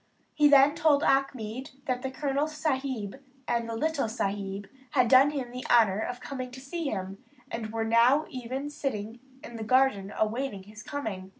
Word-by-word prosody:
He 300 -1 +5
then 280 0 +7
told 295 -3 +3
Achmed 260 -2 0
that 250 -1 -1
the 265 - -3
Colonel 280 +2 -1
Sahib 270 -7 -3 0.3
and 235 -1 0
the 230 - -3
little 295 -1 0
Sahib 200 -2 -3 0.2
had 255 -3 +3
done 265 +4 +7
him 270 -5 -4
the 250 +1 -6
honour 215 -5 +5
of 245 +2 -3
coming 255 -1 -6
to 260 - -8
see 315 +5 -5
him, 195 -4 -4 0.3
and 220 -2 -4
were 225 0 -1 0.4
even 255 +2 -5
now 290 - -4
sitting 235 -6 -4 0.2
in 235 - -8
the 220 - -4
garden 215 -4 +2
awaiting 220 -2 -1
his 210 +2 -12
coming. 215 -9 -5
255 Hz, 175 wpm, -28 LUFS, 220-275 Hz, 0.4 s, then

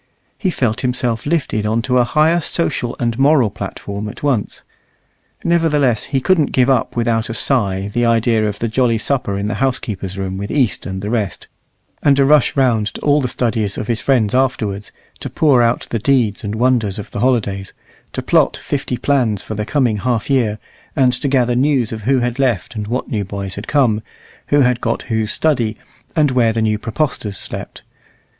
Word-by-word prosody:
He 190 - -1
felt 120 -10 -1
himself 125 -1 -1
lifted 145 -9 0
on 115 +2 0
to 125 0 +2
a - - +5
higher 155 +7 +2
social 140 -7 -1
and 120 0 -1
moral 135 -6 +4
platform 100 +2 -6
at - - -11
once. 130 -8 -1 0.8
Nevertheless 150 -9 +2
he 135 -1 -1
couldn't 155 +1 +2
give 130 +1 +4
up 125 -4 0
without 115 -1 0
a 115 - -4
sigh 100 -9 0
the 120 +4 -1
idea 115 -1 +2
of 105 -1 -3
the 115 - -2
jolly 115 0 +1
supper 110 -4 -1
in 100 +1 -2
the 110 - -2
housekeeper's 105 -7 -2
room 95 -1 -3
with 100 0 -5
East 130 -7 0
and 95 0 -5
the 105 - -3
rest, 105 -5 -2 0.5
and 140 -2 +4
a 140 - +4
rush 150 -1 +4
round 120 -6 +2
to - - -7
all 145 0 +3
the 130 - 0
studies 115 -5 -1
of - - -3
his 115 0 -1
friends 120 -7 +2
afterwards, 110 -6 -1 0.3
to - - -5
pour 140 -6 +3
out 120 0 +1
the 115 - 0
deeds 120 -4 +1
and 105 0 -3
wonders 115 -4 +1
of 105 - -7
the - - -4
holidays, 105 -6 0 0.4
to - - -4
plot - - +2
fifty 135 -3 -3
plans 120 -9 +1
for - - -6
the 105 0 -4
coming 125 -7 +1
half 120 +4 -1
year, 115 -6 +2 0.4
and 130 -4 +3
to 140 - -1
gather 125 -3 +2
news 130 -3 +1
of 110 -1 -5
who 130 0 +3
had 120 +2 -2
left 120 -4 0
and 105 -2 -5
what 125 +3 -3
new 105 -4 -1
boys 100 -1 -5
had 100 - -7
come, 120 -7 +2 0.5
who 145 0 +3
had 125 -2 +2
got 115 - -1
who's 110 -1 0
study, 120 -9 0 0.4
and 150 -4 +3
where 120 -3 +2
the 115 - -1
new 105 -1 +1
praepostors 115 - -2
slept. - - -6
120 Hz, 195 wpm, -18 LUFS, 105-135 Hz, 0.8 s, a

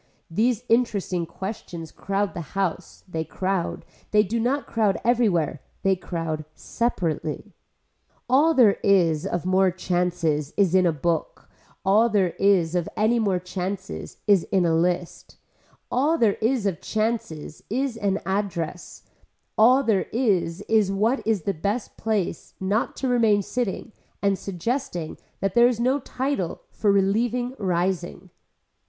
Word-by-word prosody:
These 230 +6 +1
interesting 200 -7 +1
questions 170 -3 -7
crowd 195 0 -2
the 175 - -4 0.2
house, 195 -4 -2
they 160 -3 -3
crowd, 185 +1 -2 0.2
they 210 0 +4
do 225 +4 -2
not 265 +5 0
crowd 215 -4 +1
everywhere. 195 - +2 0.2
They 195 0 +3
crowd 165 -3 -4
separately. 180 -5 -2 0.7
All 295 +6 +4
there 225 -6 +5
is 175 -4 +3
of 175 -3 -2
more 185 +1 +4
chances 175 -4 -1
is 195 -4 +3
in 185 -1 +5
a - - +3
book, 160 +1 -3 0.3
all 215 +5 +4
there 195 -5 +2
is 185 -5 +3
of 175 -2 -1
any 225 +3 +3
more 200 -4 +1
chances 185 +2 -5
is 200 -5 +4
in 190 -3 +1
a 165 - +2
list, 175 +1 -1 0.5
all 290 +6 +2
there 220 -7 +2
is 230 -1 +1
of 185 -6 -1
chances 215 -9 -3
is 255 +3 -1
in 200 -3 0
an - - -10
address, 190 -4 -3 0.5
all 250 +5 +5
there 215 -6 +1
is 200 -7 +1
is 210 -2 +2
what 220 +7 +1
is 215 -7 +1
the 200 - 0
best 200 +8 -3
place 215 -5 -2
not 200 +4 0
to 265 - -2
remain 225 -5 +3
sitting 235 0 -3 0.3
and 200 -2 +1
suggesting 195 - -3 0.2
that 195 -1 0
there 240 0 +6
is 245 -2 -1
no 260 +4 +2
title 260 -8 -3
for 205 - +1
relieving 230 +6 +1
rising. 180 - -2
195 Hz, 145 wpm, -24 LUFS, 175-230 Hz, 0.7 s, there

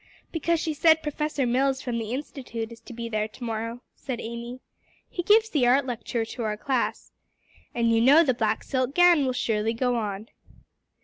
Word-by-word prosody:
"Because 335 0 0
she 320 -1 -2
said 315 +1 +4
Professor 300 -2 -1
Mills 265 +2 +1
from 240 -2 -2
the 225 -1 -5
Institute 245 -4 -5
is 230 - -11
to 230 - -13
be 235 0 -5
there 215 -1 -1
to 220 +3 -12
morrow," 230 +1 -4
said 255 -4 -6
Amy. 235 +2 -6 0.5
"He 355 - -4
gives 430 +5 +4
the 265 -6 +2
art 260 +3 +4
lecture 235 -2 -3
to 240 +2 -7
our 210 -1 -2
class. 260 0 -2 0.6
And 230 -1 +2
you 225 0 +3
know 285 +7 +7
the 265 -5 +2
black 220 -2 -1
silk 260 +1 -1
gown 350 -6 +5
will 255 - 0
surely 225 -2 0
go 245 +1 0
on." 210 -1 -4
245 Hz, 190 wpm, -26 LUFS, 230-285 Hz, 0.6 s, know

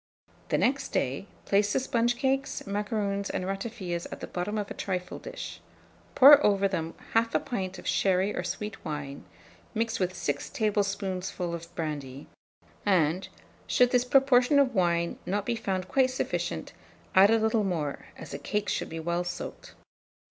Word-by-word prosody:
The - - +2
next 270 +2 +1
day, 135 +10 -1 0.2
place 205 +1 +2
the - - +3
sponge 240 -2 +1
cakes, 270 +2 -1
macaroons, 200 0 -2
and 185 - -2
ratafias 195 -3 -4
at - - -6
the - - -5
bottom 185 +4 -3
of 205 -1 -3
a - - -2
trifle 180 -2 -4
dish; - - -7 0.5
pour 290 +2 +9
over 200 -1 +4
them 165 -4 -3 0.2
1/2 230 0 +2
pint 190 -8 -3
of - - -11
sherry 190 +1 +2
or - - -2
sweet 210 +3 -5
wine, 145 -2 -5 0.5
mixed 225 0 0
with 185 -1 -1
6 145 -5 -2
tablespoonfuls 195 -4 -1
of 170 - -24
brandy, 145 -4 -4 0.6
and, 180 -2 +2 0.4
should 250 -1 +4
this 250 -1 +4
proportion 265 +1 +4
of 275 -3 +4
wine 170 -3 +1
not 205 +2 -1
be 240 - 0
found 190 -4 -2
quite 260 +3 +3
sufficient, 255 - -3 0.4
add 195 +2 +7
a 225 - +5
little 220 0 +2
more, 160 -7 -2
as - - -9
the - - -5
cakes 210 0 -1
should - - -3
be 165 - -5
well 170 +2 -1
soaked. 175 - -7
200 Hz, 165 wpm, -28 LUFS, 175-230 Hz, 0.6 s, pour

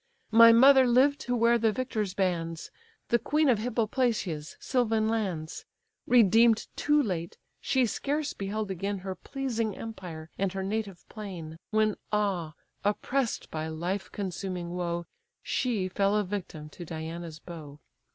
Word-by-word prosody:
My 230 +1 +9
mother 260 +2 +7
lived 270 +4 +4
to 245 - +1
wear 235 0 +4
the 225 -1 +3
victor's 215 -5 -2
bands, 170 -4 -2 0.4
The 235 - +3
queen 300 +6 +1
of 235 -4 +3
Hippoplacia's 220 - -1
sylvan 225 -4 +1
lands: 190 -8 -2 0.4
Redeem'd 230 -1 +5
too 295 0 +3
late, 175 -6 -3 0.2
she 260 -2 +2
scarce 290 +6 -2
beheld 205 +1 -3
again 195 +2 -2
Her 190 - -2
pleasing 230 0 -3
empire 175 -8 -8
and 195 -1 0
her 190 0 -3
native 200 -2 -4
plain, 175 -7 -8
When 215 -1 +2
ah! 190 -7 0 0.3
oppress'd 235 +4 -1
by 155 0 -3
life 175 +5 -3
consuming 185 -3 -4
woe, 175 -1 -2 0.4
She 220 -7 0
fell 200 +2 +1
a 210 - +2
victim 180 -6 -6
to 175 - -9
Diana's 165 0 -6
bow. 155 -4 -10
205 Hz, 140 wpm, -28 LUFS, 175-230 Hz, 0.4 s, My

